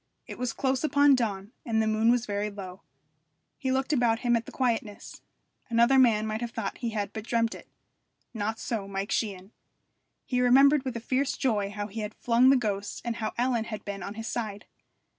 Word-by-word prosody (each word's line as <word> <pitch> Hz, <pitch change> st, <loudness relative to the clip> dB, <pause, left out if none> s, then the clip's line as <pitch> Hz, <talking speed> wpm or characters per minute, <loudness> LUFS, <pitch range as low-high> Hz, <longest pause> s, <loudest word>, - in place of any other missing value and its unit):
It -, -, -9 dB
was 250 Hz, -1 st, -1 dB
close 265 Hz, +2 st, -1 dB
upon 285 Hz, -2 st, +5 dB
dawn, 210 Hz, -5 st, -1 dB
and 225 Hz, -2 st, 0 dB
the 220 Hz, -, +2 dB
moon 220 Hz, +1 st, +2 dB
was 245 Hz, 0 st, +3 dB
very 205 Hz, 0 st, -2 dB
low. 195 Hz, -2 st, -9 dB, 0.8 s
He 265 Hz, -, -1 dB
looked 265 Hz, +3 st, 0 dB
about 235 Hz, -4 st, +2 dB
him 240 Hz, -1 st, +2 dB
at 230 Hz, 0 st, -2 dB
the -, -, -8 dB
quietness. 225 Hz, -5 st, -2 dB, 0.5 s
Another 235 Hz, +3 st, +4 dB
man 220 Hz, -4 st, +4 dB
might 215 Hz, +1 st, -3 dB
have 240 Hz, -, -2 dB
thought 225 Hz, -3 st, -5 dB
he 235 Hz, -, -2 dB
had 205 Hz, -2 st, -3 dB
but 220 Hz, -, -5 dB
dreamt 230 Hz, 0 st, 0 dB
it; -, -, -12 dB, 0.6 s
not 220 Hz, 0 st, -2 dB
so 215 Hz, -5 st, -3 dB
Mike 195 Hz, +1 st, -4 dB
Sheehan. 195 Hz, -3 st, -2 dB, 0.7 s
He 250 Hz, -1 st, 0 dB
remembered 275 Hz, +3 st, +5 dB
with 250 Hz, -2 st, -3 dB
a -, -, -6 dB
fierce 260 Hz, +3 st, 0 dB
joy 210 Hz, -6 st, 0 dB
how 205 Hz, 0 st, -4 dB
he 215 Hz, +2 st, -7 dB
had 210 Hz, 0 st, -5 dB
flung 245 Hz, +2 st, +4 dB
the 270 Hz, -, +6 dB
ghost 205 Hz, -4 st, -3 dB
and 235 Hz, -1 st, -2 dB
how 215 Hz, -1 st, -3 dB
Ellen 240 Hz, -2 st, +1 dB
had 215 Hz, -2 st, -7 dB
been 200 Hz, -1 st, -5 dB
on 200 Hz, +3 st, -6 dB
his 225 Hz, +1 st, -6 dB
side. 215 Hz, -4 st, -4 dB
225 Hz, 205 wpm, -28 LUFS, 210-250 Hz, 0.8 s, the